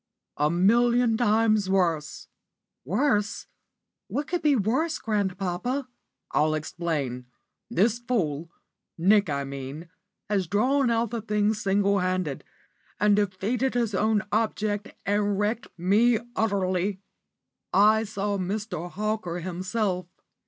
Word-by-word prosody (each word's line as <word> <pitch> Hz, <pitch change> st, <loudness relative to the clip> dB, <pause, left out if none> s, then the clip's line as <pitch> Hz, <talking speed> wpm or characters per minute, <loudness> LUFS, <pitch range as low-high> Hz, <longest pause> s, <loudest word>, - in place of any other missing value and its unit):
"A 150 Hz, +1 st, +2 dB
million 235 Hz, +6 st, +3 dB
times 215 Hz, -3 st, +2 dB
worse!" 170 Hz, -6 st, 0 dB, 0.6 s
"Worse! 210 Hz, -, 0 dB, 0.6 s
What 290 Hz, -, -2 dB
could 350 Hz, +4 st, -2 dB
be 295 Hz, -2 st, +4 dB
worse, 260 Hz, -, 0 dB
grandpapa?" 205 Hz, +5 st, -2 dB, 0.4 s
"I'll 155 Hz, +1 st, +2 dB
explain. 150 Hz, -6 st, -3 dB, 0.4 s
This 225 Hz, +6 st, +2 dB
fool 170 Hz, -, -1 dB, 0.5 s
Nick, 200 Hz, +2 st, +4 dB
I 140 Hz, -1 st, -1 dB
mean 140 Hz, +4 st, -7 dB, 0.4 s
has 195 Hz, -4 st, 0 dB
drawn 255 Hz, -, +2 dB
out 230 Hz, -1 st, +1 dB
the 235 Hz, -2 st, -3 dB
thing 210 Hz, 0 st, +1 dB
single 200 Hz, -1 st, +1 dB
handed, 185 Hz, -6 st, -1 dB, 0.6 s
and 205 Hz, +1 st, +4 dB
defeated 210 Hz, +6 st, 0 dB
his 235 Hz, -3 st, 0 dB
own 215 Hz, +2 st, +2 dB
object, 210 Hz, -1 st, -1 dB, 0.2 s
and 205 Hz, 0 st, +1 dB
wrecked 215 Hz, +5 st, -1 dB
me 210 Hz, +7 st, +3 dB, 0.2 s
utterly. 195 Hz, -2 st, 0 dB, 0.7 s
I 215 Hz, +3 st, +5 dB
saw 205 Hz, -1 st, -2 dB
Mr. 190 Hz, -2 st, -3 dB
Hawker 215 Hz, -3 st, -2 dB
himself. 185 Hz, +1 st, -2 dB
205 Hz, 110 wpm, -26 LUFS, 180-225 Hz, 0.7 s, I